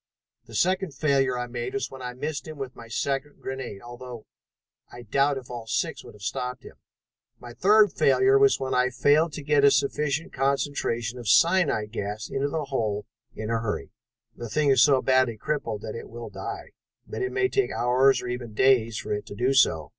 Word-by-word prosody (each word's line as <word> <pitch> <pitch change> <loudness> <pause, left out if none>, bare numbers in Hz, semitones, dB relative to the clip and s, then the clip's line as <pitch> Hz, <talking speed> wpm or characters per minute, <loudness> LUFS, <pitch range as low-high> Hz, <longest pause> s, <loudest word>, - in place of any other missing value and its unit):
"The - - -11
second 185 -4 +1
failure 135 -3 +1
I 125 - -2
made 120 +4 -5
was 205 - -2
when 135 -1 -10
I 125 -1 -6
missed 145 +4 -4
him 155 -1 -8
with 135 -2 -6
my 115 - -11
second 135 +5 -3
grenade, 130 -6 -6
although 120 -1 -9 0.7
I 120 0 -10
doubt 140 +5 +1
if 125 -2 -9
all 120 -2 -7
six - - -2
would - - -13
have 105 - -15
stopped 125 +4 -4
him. - - -13 0.6
My 120 -1 -10
third 210 - +4
failure 400 +1 +4
was 410 0 +4
when 130 - -2
we 125 0 +3
failed 150 +5 +3
to 150 - -6
get 145 -1 +2
a 140 - +8
sufficient 145 +2 0
concentration 130 -3 -1
of 120 - -8
cyanide 165 - +3
gas 105 -1 -5
into 140 +1 -1
that 155 0 -2
hole 105 -6 -1 0.3
in 110 +1 -4
a 115 - +1
hurry. 110 -2 -4 0.4
The 120 - -7
thing 145 +5 +2
is 135 - +5
so 135 -3 +5
badly 130 -3 +2
crippled 115 -5 -3
that 110 - -5
it 115 - -8
will 120 0 -8
die, - - -7 0.3
but - - -6
it 385 - -1
may 390 0 +1
take 400 +1 0
hours, 130 +3 +3
or - - -5
even 120 -3 -5
days, 115 -3 +3
for - - -3
it 105 - -4
to - - -8
do 125 +5 +1
so. 80 - +3
130 Hz, 205 wpm, -26 LUFS, 115-145 Hz, 0.7 s, a